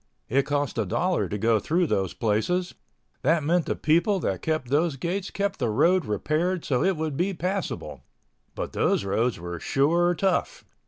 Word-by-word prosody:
It 135 +3 +2
cost 145 -4 -1
a 110 - +1
dollar 180 - 0
to 105 - -2
go 110 +1 +2
through 175 - +1
those 95 - -1
places—that 155 - -1
meant 170 +3 +1
the - - 0
people 175 +6 +2
that - - -2
kept 155 -6 -2
those 150 +2 +2
gates 180 +7 -3
kept 200 0 -2
the 120 -4 0
road 165 +10 +3
repaired 155 - -1
so 130 0 +1
it 190 -2 +1
would 155 -2 -2
be 185 +5 0
passable—but 185 +3 -6
those - - +1
roads 110 +4 0
were 85 0 -6
sure 170 - +2
tough. 195 - -1
155 Hz, 165 wpm, -26 LUFS, 125-180 Hz, -, road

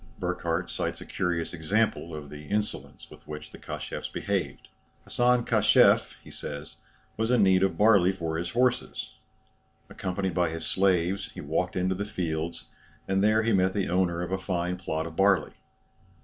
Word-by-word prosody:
Burckhardt - - -2
cites - - -2
a - - -9
curious 85 -2 -2
example 85 0 0
of 75 -2 -8
the 75 0 -9
insolence 105 +3 -3
with - - -15
which 75 0 -8
the - - -12
Kashefs - - -6
behaved. - - -3 0.4
"Hassan 125 0 +2
Kashef," - - +4
he - - -13
says, 75 +2 -7 0.4
was 110 +1 0
in 125 -4 +4
need 95 -1 +5
of 95 0 +1
barley 105 -4 +5
for 80 -4 -3
his 85 0 -3
horses. 125 +1 0 0.8
Accompanied 95 0 -2
by 85 0 +2
his 80 0 -5
slaves, 95 0 +1
he - - -9
walked - - -1
into 95 +1 +1
the 100 +2 -3
fields, 85 -4 -4 0.4
and 95 0 +1
there 110 +1 +4
met 95 0 +2
the 100 -2 0
owner 90 -1 +1
of 90 - -5
a 95 - 0
fine 90 -1 -2
plot 80 -3 -3
of 80 -1 -8
barley. 95 0 +3
95 Hz, 165 wpm, -27 LUFS, 85-100 Hz, 0.8 s, need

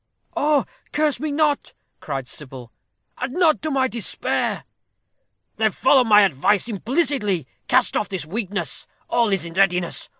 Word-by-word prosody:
"Oh, 290 -1 +2 0.3
curse 300 -1 +1
me 310 0 -2
not!" 295 -1 0 0.3
cried 135 -3 -5
Sybil. 130 -5 -9 0.5
"Add 255 +1 -3
not 335 -3 +3
to 310 - -2
my 265 -2 +2
despair." 230 -3 -2 0.9
"Then - - +3
follow 265 -3 +4
my 210 -3 +6
advice 195 - +2
implicitly. 225 - 0 0.2
Cast 255 -1 +3
off - - 0
this 185 -6 -4
weakness; 195 - -4 0.2
all 235 -2 +3
is 190 -4 0
in 165 - -8
readiness. 180 -2 +1
210 Hz, 140 wpm, -22 LUFS, 175-280 Hz, 0.9 s, my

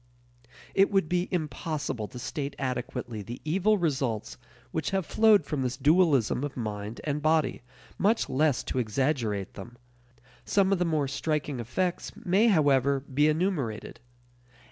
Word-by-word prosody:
It 195 0 +4
would 195 -5 +2
be 180 +1 0
impossible 150 - -3
to 125 - -11
state 140 +3 -4
adequately 125 -3 -4
the 120 +5 -7
evil 195 +7 +2
results 135 - -1 0.4
which 160 -3 -2
have 190 -3 -1
flowed 215 -5 +4
from 145 -2 -2
this 125 -1 -2
dualism 145 - +3
of 145 -2 -4
mind 105 -1 -4
and 150 0 -2
body, 155 +1 +1 0.4
much 220 +4 +2
less 145 -1 +1
to 130 - -2
exaggerate 115 -4 -1
them. 120 +5 -10 0.7
Some 195 -1 +2
of 190 - 0
the 180 - +2
more 155 -4 +1
striking 145 -1 -2
effects, 175 +10 -2
may, 195 +6 +2
however, 140 - +3
be 140 +2 +1
enumerated. 155 - -1
145 Hz, 145 wpm, -28 LUFS, 125-175 Hz, 0.7 s, It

